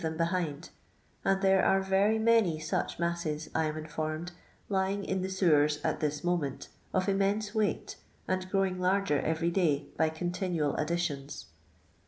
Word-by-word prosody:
them 160 Hz, -1 st, -3 dB
behind; 165 Hz, -2 st, -1 dB, 0.5 s
and 195 Hz, +1 st, +1 dB
there 190 Hz, 0 st, +4 dB
are 195 Hz, -, +4 dB
rery 195 Hz, +3 st, +3 dB
many 220 Hz, -7 st, +3 dB
such 155 Hz, 0 st, -2 dB
masses, 170 Hz, -3 st, -2 dB
I 160 Hz, -, +1 dB
am 155 Hz, 0 st, -2 dB
informed, 155 Hz, +2 st, -4 dB, 0.4 s
lying 195 Hz, 0 st, 0 dB
in 190 Hz, 0 st, -1 dB
the 190 Hz, -, -2 dB
sewers 150 Hz, -6 st, +3 dB
at -, -, 0 dB
this 150 Hz, -1 st, -2 dB
moment, 170 Hz, -6 st, -1 dB, 0.2 s
of 185 Hz, +1 st, 0 dB
immense 200 Hz, +2 st, +1 dB
weighty 215 Hz, -2 st, -1 dB, 0.3 s
and 185 Hz, 0 st, -1 dB
growing 190 Hz, -1 st, +1 dB
larger 185 Hz, -5 st, +2 dB
every 160 Hz, +3 st, 0 dB
day 150 Hz, -6 st, +1 dB
by 160 Hz, 0 st, +3 dB
continual 175 Hz, -2 st, -1 dB
additions. 150 Hz, -3 st, -2 dB
175 Hz, 150 wpm, -30 LUFS, 155-190 Hz, 0.5 s, there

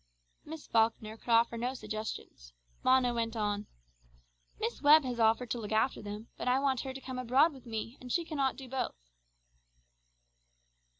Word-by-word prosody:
Miss 315 Hz, 0 st, -9 dB
Falkner 220 Hz, -1 st, +1 dB
could 225 Hz, -, -14 dB
offer 230 Hz, 0 st, +4 dB
no 250 Hz, +3 st, -2 dB
suggestion. 215 Hz, -3 st, -5 dB, 0.6 s
Mona 255 Hz, -1 st, +4 dB
went 230 Hz, -1 st, -2 dB
on 205 Hz, -1 st, -1 dB, 0.9 s
"Miss 235 Hz, -, -3 dB
Webb 300 Hz, +1 st, +7 dB
has 250 Hz, -2 st, -3 dB
offered 225 Hz, +2 st, +3 dB
to 240 Hz, -, -1 dB
look 210 Hz, -2 st, -6 dB
after 220 Hz, +4 st, +1 dB
them, 210 Hz, +2 st, -7 dB
but -, -, -4 dB
I 250 Hz, +1 st, +4 dB
want 270 Hz, -2 st, +1 dB
her 265 Hz, -, -5 dB
to -, -, -5 dB
come 255 Hz, 0 st, -5 dB
abroad 265 Hz, +6 st, +4 dB
with 260 Hz, -2 st, -14 dB
me, 225 Hz, +2 st, -5 dB
and 250 Hz, -1 st, -7 dB
she 340 Hz, +4 st, +1 dB
cannot 280 Hz, -5 st, 0 dB
do 270 Hz, -2 st, -9 dB
both." 260 Hz, -, -2 dB
245 Hz, 170 wpm, -32 LUFS, 225-265 Hz, 0.9 s, Webb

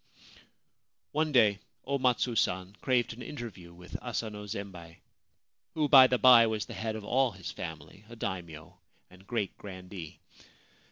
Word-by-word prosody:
One 155 Hz, +1 st, 0 dB
day 110 Hz, -7 st, +4 dB, 0.3 s
O 140 Hz, +1 st, -1 dB
Matsu 125 Hz, -1 st, +1 dB
San 95 Hz, -1 st, 0 dB
craved 125 Hz, -3 st, +1 dB
an 120 Hz, -, -11 dB
interview 115 Hz, -11 st, -8 dB
with 90 Hz, +1 st, -9 dB
Asano 110 Hz, -3 st, -4 dB
Zembei 95 Hz, -5 st, -7 dB, 0.4 s
— -, -, -55 dB
who, 155 Hz, -2 st, +1 dB
by 135 Hz, -3 st, +9 dB
the 125 Hz, -, +1 dB
by, 120 Hz, -2 st, +8 dB
was 110 Hz, -1 st, -2 dB
the -, -, -9 dB
head 110 Hz, 0 st, -3 dB
of 110 Hz, -2 st, -7 dB
all 130 Hz, 0 st, +2 dB
his 95 Hz, -4 st, -7 dB
family, 80 Hz, +4 st, -8 dB
a 120 Hz, -, -10 dB
Daimio 85 Hz, -7 st, -6 dB, 0.3 s
and 95 Hz, +1 st, -18 dB
great 115 Hz, -5 st, -2 dB
grandee. 95 Hz, -4 st, -9 dB
105 Hz, 155 wpm, -30 LUFS, 95-125 Hz, 0.4 s, by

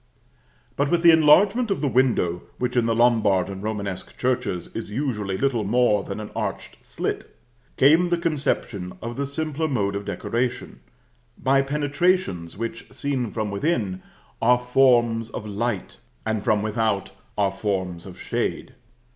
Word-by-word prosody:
But 140 Hz, 0 st, +1 dB
with 175 Hz, +1 st, +1 dB
the 170 Hz, -, +9 dB
enlargement 190 Hz, +10 st, +5 dB
of 195 Hz, -, 0 dB
the 145 Hz, -, +1 dB
window, 120 Hz, -10 st, +2 dB, 0.2 s
which, 125 Hz, 0 st, -2 dB
in 120 Hz, -2 st, +3 dB
the 115 Hz, -, +1 dB
Lombard 110 Hz, -6 st, +3 dB
and 95 Hz, -1 st, -6 dB
Romanesque 100 Hz, -3 st, -5 dB
churches, 125 Hz, -8 st, -2 dB
is 115 Hz, -, -5 dB
usually 105 Hz, -6 st, -2 dB
little 130 Hz, -4 st, +1 dB
more 105 Hz, -1 st, +2 dB
than 100 Hz, +2 st, -6 dB
an 105 Hz, -, -7 dB
arched -, -, -4 dB
slit, -, -, -4 dB, 0.4 s
came 160 Hz, +6 st, +5 dB
the 175 Hz, -, +2 dB
conception 140 Hz, -, -2 dB
of 120 Hz, +1 st, -6 dB
the 140 Hz, +2 st, -2 dB
simpler 155 Hz, +2 st, -2 dB
mode 100 Hz, -8 st, 0 dB
of 100 Hz, 0 st, -4 dB
decoration, 115 Hz, -, -3 dB, 0.6 s
by 135 Hz, +1 st, +3 dB
penetrations 145 Hz, -, 0 dB
which, 115 Hz, +1 st, -5 dB
seen 135 Hz, -5 st, -2 dB
from 110 Hz, -2 st, -3 dB
within, 100 Hz, -, -1 dB, 0.4 s
are 125 Hz, +2 st, +5 dB
forms 120 Hz, -3 st, +3 dB
of -, -, -6 dB
light, 105 Hz, -, -3 dB, 0.3 s
and, 110 Hz, -2 st, -1 dB
from 105 Hz, -1 st, +2 dB
without, 110 Hz, -2 st, -1 dB, 0.3 s
are 100 Hz, -2 st, +2 dB
forms 95 Hz, -3 st, -3 dB
of 90 Hz, -, -11 dB
shade. -, -, -3 dB
115 Hz, 150 wpm, -24 LUFS, 100-140 Hz, 0.6 s, the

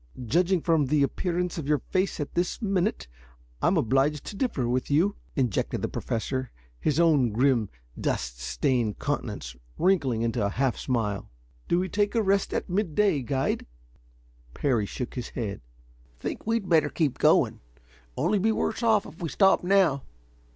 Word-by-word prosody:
"Judging 175 Hz, -, +2 dB
from 160 Hz, -4 st, +2 dB
the 145 Hz, +1 st, +3 dB
appearance 180 Hz, +4 st, -1 dB
of 145 Hz, -, -5 dB
your 150 Hz, 0 st, +3 dB
face 185 Hz, +5 st, -1 dB
at 145 Hz, -, -4 dB
this 175 Hz, +1 st, -1 dB
minute, 195 Hz, -, 0 dB, 0.5 s
I'm -, -, +3 dB
obliged 135 Hz, +5 st, +1 dB
to -, -, -6 dB
differ 195 Hz, -, -1 dB
with 125 Hz, +1 st, -1 dB
you," 170 Hz, +8 st, +2 dB, 0.2 s
interjected 125 Hz, -8 st, -1 dB
the -, -, +1 dB
Professor, 130 Hz, +2 st, -3 dB, 0.3 s
his 150 Hz, +1 st, +1 dB
own 150 Hz, -8 st, +4 dB
grim, 115 Hz, -1 st, +2 dB, 0.3 s
dust -, -, -2 dB
stained 105 Hz, -, 0 dB
countenance -, -, -3 dB, 0.2 s
wrinkling 135 Hz, -12 st, +2 dB
into 115 Hz, -1 st, 0 dB
a 100 Hz, -, +1 dB
half 130 Hz, +3 st, 0 dB
smile. 110 Hz, -6 st, -2 dB, 0.4 s
"Do 170 Hz, -, +2 dB
we 185 Hz, +1 st, 0 dB
take 205 Hz, +4 st, 0 dB
a 225 Hz, -, +3 dB
rest 195 Hz, 0 st, +1 dB
at -, -, -2 dB
midday, 190 Hz, -3 st, +1 dB
guide?" 130 Hz, +2 st, -1 dB, 0.9 s
Parry 120 Hz, -8 st, +1 dB
shook 125 Hz, +3 st, -5 dB
his 125 Hz, -3 st, -5 dB
head. 100 Hz, -, -4 dB, 0.6 s
"Think -, -, -5 dB
we'd 225 Hz, -4 st, 0 dB
better 160 Hz, -4 st, +4 dB
keep 150 Hz, -5 st, -1 dB
going. -, -, +4 dB, 0.6 s
Only 200 Hz, +5 st, +2 dB
be 220 Hz, +4 st, +2 dB
worse 220 Hz, +1 st, -1 dB
off 220 Hz, -3 st, +3 dB
if 165 Hz, -, -12 dB
we 165 Hz, -, -2 dB
stop 195 Hz, +1 st, +4 dB
now. 180 Hz, -7 st, +3 dB
150 Hz, 160 wpm, -27 LUFS, 125-185 Hz, 0.9 s, own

